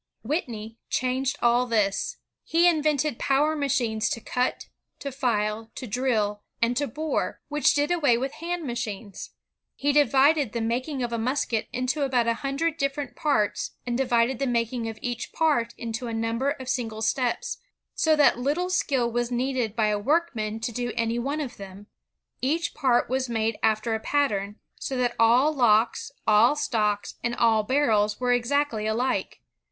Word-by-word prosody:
Whitney 230 -5 -4
changed 255 +1 0
all 240 +1 +3
this. 210 -4 0 0.3
He 335 +2 +3
invented 305 -5 +1
power 290 +3 +2
machines 240 -7 0
to - - -2
cut, 250 +2 -2 0.3
to 280 - -5
file, 225 -4 -1
to 260 - -6
drill, 215 -3 0 0.2
and 235 +1 +1
to 285 - 0
bore, 305 +6 -2
which 295 +1 +3
did 290 +2 +1
away 290 -9 +3
with 265 +2 -2
hand 340 +1 -4
machines. 225 -5 -5 0.5
He 285 0 0
divided 285 -2 +4
the 235 - -1
making 255 +4 -2
of 235 -1 -3
a 230 - -1
musket 245 -2 -1
into 255 +4 -1
about 260 -4 +2
a 230 - +2
hundred 285 +4 -1
different 275 -2 -2
parts, 215 -9 0
and 240 -1 -2
divided 245 -1 +1
the 275 - 0
making 235 -1 -1
of 220 - -7
each 240 -2 -4
part 285 -8 +1
into 235 +1 -4
a 230 - -3
number 230 +4 0
of 265 -3 -5
single 225 -4 -2
steps, 245 +2 -1 0.3
so 315 -1 +3
that 290 -4 +4
little 310 +8 0
skill 265 -9 +1
was 240 0 -1
needed 245 -3 -1
by 220 -2 +2
a 210 -1 0
workman 235 -5 0
to 235 - -2
do 240 +1 -3
any 230 0 0
one 280 +5 -2
of 270 -5 -5
them. 195 0 -10 0.6
Each 320 +6 0
part 260 -5 +2
was 260 0 -1
made 225 -1 -1
after 220 +1 +1
a 220 - -1
pattern, 210 -6 0 0.2
so 265 - -3
that 245 -1 0
all 245 +7 +5
locks, 230 -2 +2
all 220 +5 +5
stocks, 210 -7 -1
and 240 0 -1
all 225 -2 +3
barrels 215 -4 +1
were 250 -1 +2
exactly 245 -3 0
alike. 240 +4 -1
245 Hz, 170 wpm, -26 LUFS, 225-280 Hz, 0.6 s, all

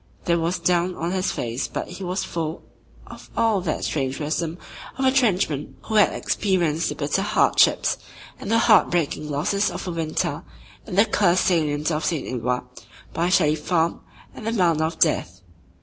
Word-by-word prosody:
There 170 -1 +2
was 170 +2 0
down 175 +1 +1
on 170 +2 -3
his 185 0 0
face 120 +2 -3
but - - -5
he 180 +2 -8
was 185 +1 -2
full 165 -1 -4 0.4
of - - -12
all 225 -4 +2
that 170 -3 -2
strange 135 -3 -2
wisdom 160 +2 -2 0.4
of 265 - 0
a 260 - +5
trenchman 190 - +1
who 220 - -6
had 210 -2 +5
experienced 170 -5 0
the 150 - -4
bitter 145 +6 -1
hardships 200 - +3 0.4
and - - -6
the 230 - +3
heartbreaking 175 -9 +3
losses 170 +8 0
of - - -6
a - - -2
winter 165 -2 -2 0.4
in 190 - -5
the 200 +3 +6
cursed 185 -5 +2
salient 155 -3 +1
of 155 0 -1
St. 165 -4 -1
Eloi, 125 0 -1 0.5
by 170 +2 0
Shelley 155 -5 +4
Farm 165 +2 0 0.3
and 220 - -8
The 225 - 0
Mound 170 -7 +2
of 160 +1 -1
Death. 95 - +1
170 Hz, 175 wpm, -23 LUFS, 155-190 Hz, 0.5 s, the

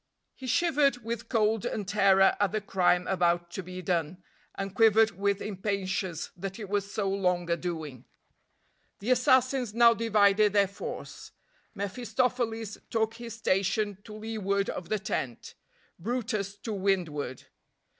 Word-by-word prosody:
He 260 - -9
shivered 275 -3 +2
with 230 0 -5
cold 220 -2 +2
and 205 -3 -3
terror 195 -1 +4
at 205 -2 +2
the 215 - +1
crime 180 -3 +2
about 175 -2 +1
to 190 - -4
be 185 0 -8
done, 175 +1 -1 0.3
and 195 -1 -4
quivered 220 +1 +5
with 200 0 -1
impatience 190 -3 -3
that 190 +1 -6
it 210 -4 -7
was 200 0 -1
so 200 -1 -1
long 180 -3 0
a - - +4
doing. 160 -7 -5 0.9
The 220 +6 -2
assassins 255 -2 +3
now 235 0 +7
divided 210 -2 +3
their 200 -1 +4
force. 200 - -8 0.4
mephistopheles 225 +1 -2
took 225 -1 0
his 230 -1 -8
station 200 -1 0
to 210 - -9
leeward 210 -2 -1
of 175 - -7
the 215 - +1
tent; 130 - -4 0.5
brutus 210 -1 -2
to 225 - -4
windward. 175 -10 -1
200 Hz, 140 wpm, -28 LUFS, 185-225 Hz, 0.9 s, now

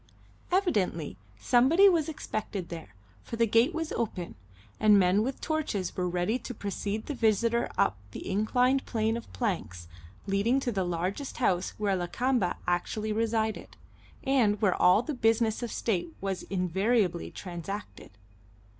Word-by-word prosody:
Evidently 205 - 0 0.2
somebody 270 +11 +5
was 330 -4 +3
expected 215 - -4
there, 160 - -8 0.3
for - - -6
the 230 0 +3
gate 230 +7 +3
was 325 -2 -3
open, 200 -7 -3 0.5
and 210 -1 +6
men 190 +1 +4
with 260 +4 -2
torches 290 - -2
were 180 -1 -1
ready 180 +7 0
to 250 +1 -7
precede 205 +1 -3
the 295 - -3
visitor 230 -1 +1
up 95 - +2
the - - -8
inclined 250 +7 +2
plane 220 -1 0
of 235 - -7
planks 130 - -3 0.4
leading 205 +6 +2
to 255 -2 -2
the 195 -4 0
largest 180 - -3
house 185 -7 0
where 205 -2 +1
Lakamba 190 +3 0
actually 210 +5 -1
resided, 220 -1 -1 0.5
and 230 -7 +2
where 195 -4 +3
all 185 +6 +4
the 305 - -3
business 225 -2 +2
of 240 -2 -4
state 175 -7 -1
was 195 -1 -3
invariably 190 0 +1
transacted. 185 +2 -7
215 Hz, 145 wpm, -29 LUFS, 185-240 Hz, 0.5 s, and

